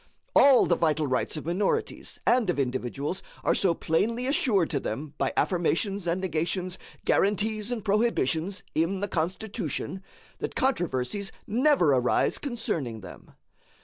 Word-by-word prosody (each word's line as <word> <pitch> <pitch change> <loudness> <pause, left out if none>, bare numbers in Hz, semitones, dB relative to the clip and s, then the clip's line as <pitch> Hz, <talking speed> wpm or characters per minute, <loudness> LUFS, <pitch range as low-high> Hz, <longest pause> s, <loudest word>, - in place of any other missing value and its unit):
All 275 -3 +7
the 170 - +3
vital 155 -2 +1
rights 130 +3 -1
of 150 - -6
minorities 180 +4 -1
and 240 -5 +3
of 175 - +1
individuals 135 +5 -2 0.2
are - - +3
so 180 -4 +2
plainly 230 +12 0
assured 225 - +2
to 145 - 0
them 140 +6 -5
by - - +1
affirmations 185 +2 0
and 170 +2 +1
negations, 180 +1 -2 0.3
guaranties 210 +2 +1
and 225 -4 -3
prohibitions, 200 - +1
in 180 +4 0
the 205 - 0
Constitution, 190 +2 -3 0.4
that - - -4
controversies 195 - -1
never 245 - +3
arise 125 -1 +2
concerning 165 - -3
them. 90 - -12
185 Hz, 135 wpm, -27 LUFS, 155-210 Hz, 0.4 s, All